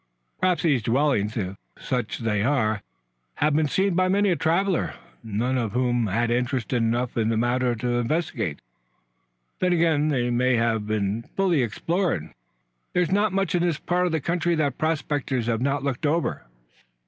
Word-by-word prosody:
"Perhaps 185 Hz, -1 st, +1 dB
these 145 Hz, -7 st, +3 dB
dwellings, 115 Hz, -3 st, +1 dB
if 95 Hz, -2 st, -3 dB, 0.2 s
such 125 Hz, -4 st, -2 dB
they 105 Hz, -3 st, -1 dB
are, 110 Hz, -4 st, +1 dB, 0.5 s
have 150 Hz, -1 st, +1 dB
been 155 Hz, 0 st, +2 dB
seen 190 Hz, +5 st, +1 dB
by 185 Hz, +1 st, +2 dB
many 200 Hz, +1 st, +3 dB
a -, -, +3 dB
traveler, 175 Hz, +3 st, 0 dB, 0.3 s
none 115 Hz, +4 st, -1 dB
of 110 Hz, -4 st, -2 dB
whom 120 Hz, -2 st, +1 dB
had 115 Hz, +4 st, 0 dB
interest 125 Hz, 0 st, -1 dB
enough 120 Hz, +1 st, 0 dB
in 110 Hz, -1 st, +2 dB
the 115 Hz, -, +1 dB
matter 120 Hz, +1 st, +1 dB
to 120 Hz, +2 st, -1 dB
investigate. 120 Hz, -, -2 dB, 1.0 s
Then 180 Hz, -1 st, +2 dB
again, 160 Hz, -3 st, +2 dB
they 125 Hz, -5 st, 0 dB
may 125 Hz, +1 st, +2 dB
have 115 Hz, -2 st, 0 dB
been 110 Hz, +1 st, -1 dB
fully 185 Hz, -7 st, +3 dB
explored. 160 Hz, -, -1 dB, 0.6 s
There's 180 Hz, -2 st, +1 dB
not 205 Hz, +1 st, +2 dB
much 195 Hz, -3 st, 0 dB
in 175 Hz, -, +2 dB
this 170 Hz, -4 st, +1 dB
part 180 Hz, +2 st, 0 dB
of -, -, -2 dB
the 160 Hz, -, +1 dB
country 170 Hz, +2 st, 0 dB
that 145 Hz, -5 st, -1 dB
prospectors 145 Hz, -5 st, -1 dB
have 115 Hz, -1 st, 0 dB
not 140 Hz, +1 st, 0 dB
looked 140 Hz, +2 st, -1 dB
over." 165 Hz, -, -1 dB
130 Hz, 170 wpm, -25 LUFS, 115-165 Hz, 1.0 s, these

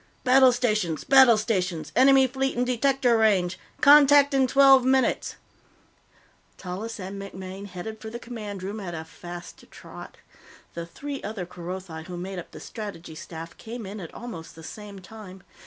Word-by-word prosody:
"Battle 260 Hz, 0 st, +6 dB
stations! 215 Hz, -9 st, -1 dB
Battle 265 Hz, -4 st, +6 dB
stations! 185 Hz, -9 st, -2 dB
Enemy 265 Hz, +1 st, +6 dB
fleet 265 Hz, 0 st, -2 dB
in 245 Hz, -, +1 dB
detector 255 Hz, 0 st, +2 dB
range! 190 Hz, -5 st, +2 dB, 0.2 s
Contact 285 Hz, 0 st, +7 dB
in 265 Hz, -1 st, +3 dB
twelve 270 Hz, 0 st, +6 dB
minutes!" 260 Hz, 0 st, +1 dB, 1.2 s
Tallis 205 Hz, +5 st, -6 dB
and 195 Hz, +1 st, -6 dB
MacMaine 190 Hz, 0 st, -8 dB
headed 215 Hz, +4 st, -8 dB
for 220 Hz, -, -7 dB
the 235 Hz, -, -6 dB
Command 215 Hz, -5 st, -7 dB
Room 205 Hz, +3 st, -5 dB
at 175 Hz, -4 st, -6 dB
a 160 Hz, 0 st, -6 dB
fast 175 Hz, +1 st, -10 dB
trot. -, -, -12 dB, 0.6 s
The 170 Hz, 0 st, -6 dB
three 280 Hz, +9 st, -7 dB
other 205 Hz, -3 st, -5 dB
Kerothi 175 Hz, -2 st, -8 dB
who 180 Hz, -1 st, -7 dB
made 185 Hz, +1 st, -5 dB
up 175 Hz, -, -10 dB
the -, -, -11 dB
Strategy 200 Hz, -8 st, -8 dB
Staff 165 Hz, +1 st, -9 dB
came 230 Hz, 0 st, -8 dB
in 200 Hz, +2 st, -7 dB
at 170 Hz, -4 st, -8 dB
almost 220 Hz, -10 st, -9 dB
the 165 Hz, -, -12 dB
same 205 Hz, +3 st, -9 dB
time. 190 Hz, -2 st, -12 dB
210 Hz, 160 wpm, -25 LUFS, 180-250 Hz, 1.2 s, Contact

